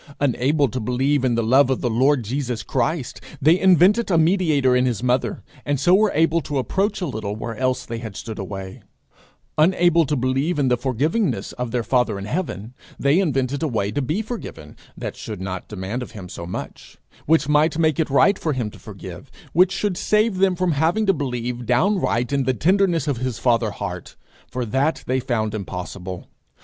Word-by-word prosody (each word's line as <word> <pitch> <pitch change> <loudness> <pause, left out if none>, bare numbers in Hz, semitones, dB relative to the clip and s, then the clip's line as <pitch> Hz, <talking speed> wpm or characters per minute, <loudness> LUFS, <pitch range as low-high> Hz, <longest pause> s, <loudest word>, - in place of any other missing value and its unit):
Unable 140 +2 +2
to 130 +2 -4
believe 130 +4 0
in 125 -3 +2
the 115 - +1
love 130 +4 +4
of 130 - 0
the 120 - 0
Lord 130 +3 +3
Jesus 125 -1 -3
Christ, 150 - -2 0.2
they 160 +6 +4
invented 190 +5 +4
a 175 - +3
mediator 160 -6 +3
in 125 0 +3
his 120 -2 -2
mother, 125 0 0 0.2
and 145 -2 -1
so 175 +6 +4
were 210 +2 +4
able 165 +1 +3
to 145 -1 -4
approach 195 - -1
a - - 0
little 110 -7 -4
where 115 +1 -5
else 130 +1 -1
they 115 -1 -5
had 110 -4 -7
stood 110 +1 -7
away; 95 -1 -7 0.8
unable 170 -1 +4
to 150 - 0
believe 135 +6 0
in 140 -3 +2
the 125 - +4
forgivingness 135 - -1
of 125 -1 -4
their 120 0 -1
father 125 -4 +1
in 100 - -6
heaven, 115 - -4 0.2
they 140 +5 +3
invented 140 -5 0
a 160 - +1
way 105 -6 -1
to 145 - -1
be 155 - -1
forgiven 210 - -8 0.2
that - - -5
should 105 -4 -7
not 95 -1 -5
demand 105 +4 -4
of 125 - -8
him 100 -5 -8
so 85 -1 -8
much; 90 - -8 0.3
which 155 -2 +3
might 150 +2 +3
make 160 -1 +2
it 160 - +1
right 185 +8 +4
for 155 - -1
him 120 -5 -3
to - - -14
forgive; - - -10 0.2
which 180 +3 +5
should 195 -1 -1
save 210 -1 +1
them 190 -1 +3
from 180 0 0
having 160 +9 +1
to 195 - +4
believe 125 - -4
downright 130 - +1
in 140 -2 +1
the 130 0 +1
tenderness 175 - +2
of 140 -4 0
his 125 -1 -3
father 115 -2 +2
heart, 100 - -6 0.3
for 125 -1 -3
that 135 +7 0
they 130 +1 0
found 115 -5 -1
impossible. 90 -2 -6
135 Hz, 200 wpm, -22 LUFS, 115-165 Hz, 0.8 s, which